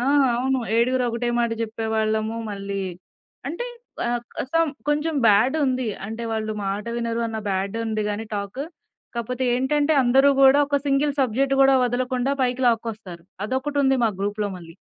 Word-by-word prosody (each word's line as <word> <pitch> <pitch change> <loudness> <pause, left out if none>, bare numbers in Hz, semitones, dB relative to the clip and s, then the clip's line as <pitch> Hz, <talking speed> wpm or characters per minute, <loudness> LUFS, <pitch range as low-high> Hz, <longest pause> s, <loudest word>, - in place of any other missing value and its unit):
ఆ! - - -2 0.3
అవును. 260 +2 +1 0.2
ఏడుగురు 250 +2 +2
ఒకటే 235 +1 -2
మాట 235 -1 +1
జేప్పేవాళ్ళము. 220 0 -1
మళ్ళీ 200 -1 -4 0.7
అంటే 345 +11 -4 0.4
ఆహ్, 240 0 0 0.2
క - - -1
సమ్ 330 -1 +3 0.2
కొంచెం 300 +2 +1
బ్యాడ్ 215 +6 +4
ఉంది. 255 -1 0 0.2
అంటే, 225 +2 -6
వాళ్ళు 220 -1 -2
మాట 200 +1 -2
వినరు 235 -1 -2
అన్న 225 -1 -4
బ్యాడ్ 195 +1 -1
ఉంది 215 -1 -1
గాని 205 +2 -3
టాక్. 200 +5 -4 0.5
కాపోతే 245 +2 -2
ఏంటంటే 290 +4 +1
అందరూ 265 +3 +5
గూడా 270 +1 +7
ఒక 285 0 +1
సింగిల్ 280 +1 +2
సబ్జెక్ట్ 270 +2 +1
కూడా 270 0 +6
వదలకుండా 250 +2 0
పైకి 255 +1 0
లాక్కొస్తారు. 220 -7 -2 0.2
అదొకటి 265 +5 -2
ఉంది 270 0 +3
మా 225 - +3
గ్రూప్‌లో 205 +1 -1
మళ్ళీ. 165 -1 -13
235 Hz, 155 wpm, -23 LUFS, 215-265 Hz, 0.7 s, గూడా